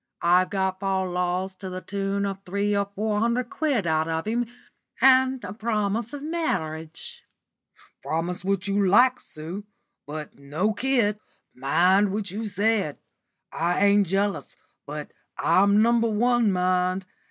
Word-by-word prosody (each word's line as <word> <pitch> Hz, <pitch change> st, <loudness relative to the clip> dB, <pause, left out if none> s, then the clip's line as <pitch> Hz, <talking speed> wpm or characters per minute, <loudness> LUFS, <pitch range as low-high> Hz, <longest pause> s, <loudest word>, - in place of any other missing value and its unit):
I've 180 Hz, +2 st, +4 dB
got 190 Hz, -1 st, -1 dB
fal 190 Hz, -1 st, 0 dB
lals 180 Hz, +1 st, -2 dB
to 190 Hz, -, -6 dB
the 185 Hz, 0 st, -5 dB
tune 200 Hz, +1 st, -2 dB
of 195 Hz, -1 st, -3 dB
three 200 Hz, +2 st, -1 dB
or 200 Hz, 0 st, +1 dB
four 210 Hz, 0 st, 0 dB
hundred 235 Hz, +2 st, 0 dB
quid 280 Hz, -, 0 dB
out 160 Hz, -1 st, +1 dB
of 160 Hz, 0 st, -2 dB
him, 235 Hz, +2 st, -1 dB, 0.5 s
and 260 Hz, -1 st, +4 dB
a 190 Hz, -1 st, -6 dB
promise 215 Hz, 0 st, -1 dB
of 290 Hz, -1 st, -7 dB
marriage." 160 Hz, -, -3 dB, 0.8 s
"Promise 170 Hz, +3 st, -3 dB
what 195 Hz, +1 st, -1 dB
you 200 Hz, 0 st, +1 dB
like, 250 Hz, +6 st, +5 dB
Sue, 165 Hz, +6 st, -7 dB, 0.4 s
but 150 Hz, -1 st, -7 dB
no 155 Hz, +10 st, -1 dB
kid. 225 Hz, -3 st, +1 dB, 0.3 s
Mind 180 Hz, +9 st, +3 dB
what 205 Hz, -1 st, -1 dB
you 215 Hz, +3 st, -4 dB
said. 205 Hz, -6 st, 0 dB, 0.5 s
I 175 Hz, +4 st, +1 dB
ain't 200 Hz, -1 st, +4 dB
jealous, 200 Hz, +3 st, -1 dB, 0.3 s
but -, -, -6 dB, 0.3 s
I'm 200 Hz, +2 st, +4 dB
No. 235 Hz, -, +4 dB
1, 230 Hz, 0 st, +2 dB
mind. 185 Hz, 0 st, +1 dB
200 Hz, 140 wpm, -25 LUFS, 180-220 Hz, 0.8 s, like